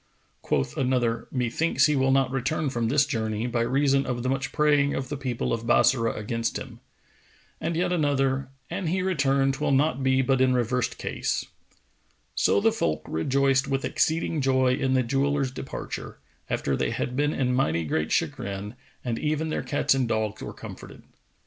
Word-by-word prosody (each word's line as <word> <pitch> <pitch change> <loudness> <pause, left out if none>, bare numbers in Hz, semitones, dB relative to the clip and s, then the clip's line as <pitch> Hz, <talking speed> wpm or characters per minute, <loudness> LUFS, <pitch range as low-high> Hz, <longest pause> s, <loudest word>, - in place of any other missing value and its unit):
Quoth 65 - -1
another, 125 -3 0
"Methinks 125 +6 +1
he 150 - +2
will 135 -1 +2
not 135 -1 +3
return 135 +2 -1
from 120 -3 -1
this 140 +4 +3
journey, 110 -4 -2
by 120 -1 0
reason 135 +3 +2
of 120 -1 -2
the 130 - 0
much 135 +1 -1
praying 145 -2 +3
of 130 - -3
the 145 - -3
people 130 -5 -2
of 115 0 -3
Bassorah 120 -1 +3
against 115 +2 -2
him."[FN#456] - - -9 0.8
And 165 +1 -1
yet 180 +1 +1
another, 135 -4 +1 0.2
"An 185 - -3
he 185 +3 0
return, 140 -7 +2
'twill 135 +3 -2
not 140 0 +2
be 130 0 +3
but 130 0 +2
in 130 -1 +4
reversed 125 0 0
case."[FN#457] - - -4 0.6
So - - +3
the 225 +2 +3
folk 75 - -1
rejoiced 135 - +1
with 135 0 -1
exceeding 160 -1 0
joy 130 -1 +3
in 130 -1 +1
the 130 - +3
jeweller's 135 +2 0
departure, 130 0 -6 0.3
after 70 - 0
they - - 0
had 125 - -3
been 145 +2 +1
in 125 -3 0
mighty 85 -11 +1
great 80 0 -1
chagrin, 100 +2 -2 0.3
and 115 -2 -2
even 155 +1 -1
their - - -1
cats 145 - +1
and 130 -2 0
dogs 110 -2 -1
were - - -5
comforted. - - -10
135 Hz, 175 wpm, -26 LUFS, 120-140 Hz, 0.8 s, in